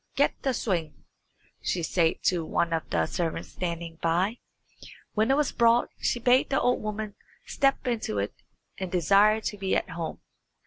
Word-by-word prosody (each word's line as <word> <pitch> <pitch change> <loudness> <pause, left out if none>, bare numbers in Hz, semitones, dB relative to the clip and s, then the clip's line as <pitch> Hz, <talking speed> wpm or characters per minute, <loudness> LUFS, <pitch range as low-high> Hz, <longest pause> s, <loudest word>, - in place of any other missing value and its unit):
"Get 285 - +3
the 265 -2 0
swing," 170 -9 -2 0.6
she 175 - -1
said 165 0 +1
to 175 -2 +2
one 170 +1 0
of 160 - -2
the - - +1
servants 165 -2 -3
standing 170 -2 -5
by. 180 +8 +1 0.7
When 220 +2 +2
it 270 - +4
was 300 -2 +1
brought 235 0 +3
she 240 - 0
bade 250 +2 +4
the 270 - +2
old 250 - +1
woman 215 0 -4 0.3
step 275 0 +1
into 230 - -1
it 100 +1 -1 0.5
and 190 -2 -4
desire 200 +5 +4
to 210 - -3
be 190 -1 0
at - - -1
home. 165 -2 -5
195 Hz, 170 wpm, -27 LUFS, 170-235 Hz, 0.7 s, it